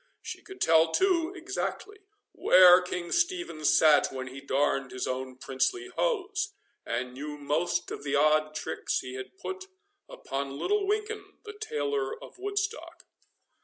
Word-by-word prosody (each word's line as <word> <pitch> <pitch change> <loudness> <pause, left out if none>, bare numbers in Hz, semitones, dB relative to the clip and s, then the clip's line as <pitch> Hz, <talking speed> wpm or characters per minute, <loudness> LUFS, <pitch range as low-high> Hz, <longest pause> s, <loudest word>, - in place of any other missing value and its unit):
She - - -7
could 385 - -12
tell, 160 0 +5
too, 360 - +2
exactly, 385 +4 -4 0.3
where 180 0 +7
King 180 -1 -5
Stephen 345 - 0
sat 150 0 +5
when 130 -1 -5
he 135 +2 -9
darned 135 -1 0
his 130 - -4
own 130 0 -4
princely 370 - -1
hose, 405 -4 -1 0.3
and 125 +2 -3
knew 150 +3 -6
most 150 +4 -1
of - - -5
the 145 0 -1
odd 155 +1 +3
tricks - - -2
he 130 - -8
had 130 - -8
put 380 +1 -6 0.4
upon 140 0 -5
little 405 - 0
Winkin, 420 -1 -3
the 425 - -7
tailor 145 - -2
of - - -13
Woodstock. 405 +3 -4
170 Hz, 145 wpm, -28 LUFS, -, 0.4 s, where